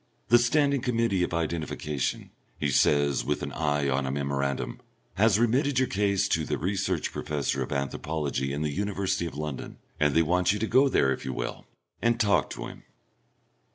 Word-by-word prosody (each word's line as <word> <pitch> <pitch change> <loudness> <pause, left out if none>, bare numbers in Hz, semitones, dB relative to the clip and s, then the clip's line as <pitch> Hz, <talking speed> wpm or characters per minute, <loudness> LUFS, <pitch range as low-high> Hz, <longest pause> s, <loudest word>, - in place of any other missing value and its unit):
"The 120 - +7
Standing 140 +2 +2
Committee 115 -6 +1
of 90 - 0
Identification," 80 -4 -2 0.3
he 70 -1 0
says, 70 +1 +3
with 75 +1 -2
an - - -4
eye 75 -2 0
on 65 0 0
a - - -1
memorandum, 70 -1 -2 0.3
"has 105 +3 +4
remitted 130 +5 +2
your 130 0 +3
case 100 -1 +1
to 80 - +1
the - - -2
Research 95 -2 -1
Professor 75 -3 -2
of - - -4
Anthropology 70 0 -2
in 75 +2 -2
the 75 - -1
University 100 -2 -1
of 75 - -8
London, 75 -3 -5 0.2
and 75 -2 +2
they 80 - +5
want 90 +3 +2
you - - -2
to 110 - -1
go 130 +5 +4
there, 65 - +3
if - - -7
you 65 - -3
will, - - -5 0.3
and 120 0 +2
talk 105 -4 +3
to - - -6
him." - - -10
85 Hz, 185 wpm, -27 LUFS, 70-105 Hz, 0.3 s, The